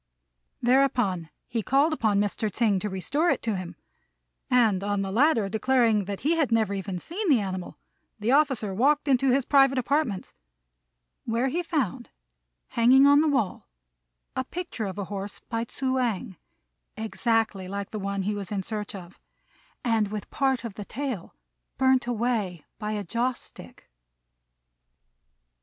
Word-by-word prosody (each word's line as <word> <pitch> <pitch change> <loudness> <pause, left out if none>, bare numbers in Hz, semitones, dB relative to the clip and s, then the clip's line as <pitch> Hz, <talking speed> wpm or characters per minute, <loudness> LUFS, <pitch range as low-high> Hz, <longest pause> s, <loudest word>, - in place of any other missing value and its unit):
Thereupon 240 -9 +2 0.2
he 230 -2 -2
called 280 +8 +3
upon 215 -8 +1
Mr. 205 +1 0
Tsêng 205 -2 +1
to 210 - -2
restore 280 - 0
it - - 0
to 225 -3 0
him; 185 -2 -6 0.7
and, 220 -6 +3
on 205 -1 0
the 195 - -4
latter 235 -2 +3
declaring 220 -1 +2
he 310 - +1
had 290 -7 +1
never 220 -3 +2
even 195 -1 -4
seen 360 - -4
the 270 -6 +5
animal, 185 -3 -5 0.4
the 215 +4 0
officer 265 -8 +2
walked 285 +8 +2
into 270 0 +3
his 260 0 +2
private 270 -2 +4
apartments, 255 -6 -1 0.9
where 235 +3 0
he 340 +7 -1
found, 300 - -2 0.6
hanging 255 +4 +5
on 285 +1 +6
the 315 - +2
wall, 245 - -1 0.7
a 260 - 0
picture 340 -6 -5
of 190 0 -6
a 200 - -2
horse, 200 +1 -6
by 230 0 -1
Tzŭ 260 +2 -1
ang, 210 -6 -2 0.6
exactly 220 -3 0
like 200 +1 -5
the 215 - -4
one 200 0 -2
he 210 +2 -1
was 200 -2 -6
in 200 -2 -2
search 210 0 -5
of, 185 -1 -11 0.6
and 225 -3 +2
with 210 0 -6
part 265 -3 +1
of 230 -4 -5
the 205 - -7
tail 255 -7 -5 0.4
burnt 260 -2 +3
away 225 -8 -1
by 215 -1 -3
a 205 -1 -2
joss 240 +7 -1
stick. - - -14
225 Hz, 155 wpm, -26 LUFS, 200-265 Hz, 0.9 s, on